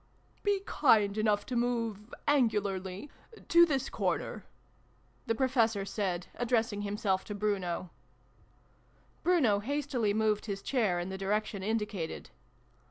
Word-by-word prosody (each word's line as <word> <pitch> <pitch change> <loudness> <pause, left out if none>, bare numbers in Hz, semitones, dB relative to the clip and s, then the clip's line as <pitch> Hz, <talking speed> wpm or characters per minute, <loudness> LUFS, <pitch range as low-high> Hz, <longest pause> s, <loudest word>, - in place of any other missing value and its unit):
" - - -35
Be 405 -1 +1
kind 210 -8 +3
enough 210 -1 +1
to 255 - -4
move 230 -3 -1 0.2
angularly 205 -4 0 0.4
to 340 0 +7
this 270 -3 0
corner," - - -2 0.8
the 225 - +1
Professor 225 -5 +2
said, 190 -3 -2
addressing 230 -4 0
himself 200 -2 -1
to 210 - -5
Bruno. 190 -4 -2 1.3
Bruno 280 - +3
hastily 255 -2 -1
moved 215 0 +1
his 195 -1 -4
chair 215 -10 +1
in 175 +2 -4
the 190 0 -5
direc 210 +2 0
tion 200 - -6
indicated. 210 -5 -3
215 Hz, 125 wpm, -31 LUFS, 200-245 Hz, 1.3 s, to